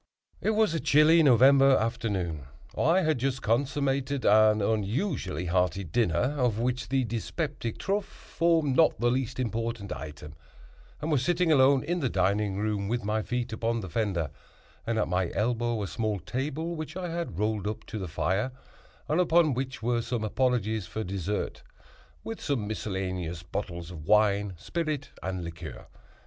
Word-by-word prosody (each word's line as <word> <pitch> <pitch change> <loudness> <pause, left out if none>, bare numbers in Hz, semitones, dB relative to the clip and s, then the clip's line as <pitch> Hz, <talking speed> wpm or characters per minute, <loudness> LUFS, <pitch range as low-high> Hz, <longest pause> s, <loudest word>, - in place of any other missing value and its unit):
It 220 - +1
was 215 -4 +3
a 165 - 0
chilly 150 +4 +5
November 135 0 +6
afternoon. 95 - -2 0.3
I 165 +6 +3
had 155 -6 +1
just 130 0 -1
consummated 135 +2 0
an 110 0 +6
unusually 105 - -1
hearty 90 +1 +1
dinner, 115 - +1
of 120 -4 +2
which 125 +2 -1
the 135 0 +2
dyspeptic 120 +2 -3
truffe 200 0 -1
formed 165 -5 0
not 160 +1 +4
the 120 0 +2
least 130 0 -2
important 115 -3 -2
item, 75 +1 -8 0.7
and 155 +2 -2
was 135 -4 +2
sitting 175 +1 +2
alone 135 -2 +5
in 175 +1 -1
the 135 -6 0
dining 100 +1 +1
room, 105 -1 -1
with 120 +1 -1
my 110 +1 0
feet 125 0 -3
upon 115 +1 -1
the 95 - -7
fender, 90 -7 -1 0.6
and 115 -1 0
at 110 - +1
my 90 -1 0
elbow 115 +1 0
a - - -3
small 105 +3 -2
table 145 - -3
which 155 +2 -6
I 180 -2 -3
had 170 - -4
rolled 105 -1 -1
up 105 - -4
to 110 - -6
the 95 - -4
fire, 90 +9 -1 0.6
and 155 +4 +2
upon 170 -4 +4
which 130 -1 -4
were 120 0 +1
some 115 -1 -3
apologies 110 -4 0
for 110 - -4
dessert, 100 +2 -3 0.6
with 115 - -6
some 135 -7 -1
miscellaneous 95 -4 -3
bottles 85 -1 -5
of 80 -3 -9
wine, 105 -2 +3
spirit 155 - -3
and 95 -1 -3
liqueur. 85 -1 -8
115 Hz, 160 wpm, -28 LUFS, 100-135 Hz, 0.7 s, November